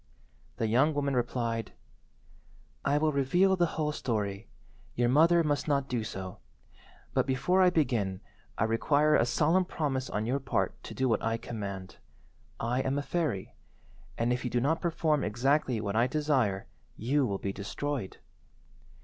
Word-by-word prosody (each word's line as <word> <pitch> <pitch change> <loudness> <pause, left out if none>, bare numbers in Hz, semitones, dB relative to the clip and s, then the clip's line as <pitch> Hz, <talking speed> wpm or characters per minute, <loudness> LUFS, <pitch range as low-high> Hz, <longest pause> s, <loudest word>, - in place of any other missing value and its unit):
The - - 0
young 130 +8 +3
woman 140 -2 0
replied— 120 -2 -1 1.1
"I 140 +1 +2
will 155 +1 +2
reveal 175 +8 +3
the 175 -2 +2
whole 150 -1 0
story. 105 -7 -3 0.5
Your 120 0 +2
mother 165 +5 +5
must 145 -1 0
not 140 -2 +1
do 120 -4 -1
so. 95 -4 -6 0.7
But - - +1
before 160 +9 +2
I 185 - +6
begin 120 - 0 0.4
I - - +1
require 145 +7 +2
a 120 - +4
solemn 160 +9 +3
promise 140 -7 -2
on 105 +1 -2
your 130 +4 0
part 135 - -1
to - - -8
do 130 - +1
what 115 -4 +1
I 115 0 0
command. 100 -5 -6 0.6
I 125 +3 0
am 135 +1 -1
a 145 - -1
fairy, 150 - -2 0.6
and, 120 +1 +1
if 125 - -3
you 125 - -1
do 120 - +1
not 145 +6 +1
perform 160 -3 +1
exactly 125 +2 +1
what 100 -1 -3
I 115 +2 +4
desire, 130 -9 0 0.3
you 135 +3 +1
will 100 -2 -2
be 100 0 -4
destroyed." 115 +3 -4
130 Hz, 160 wpm, -30 LUFS, 115-150 Hz, 1.1 s, I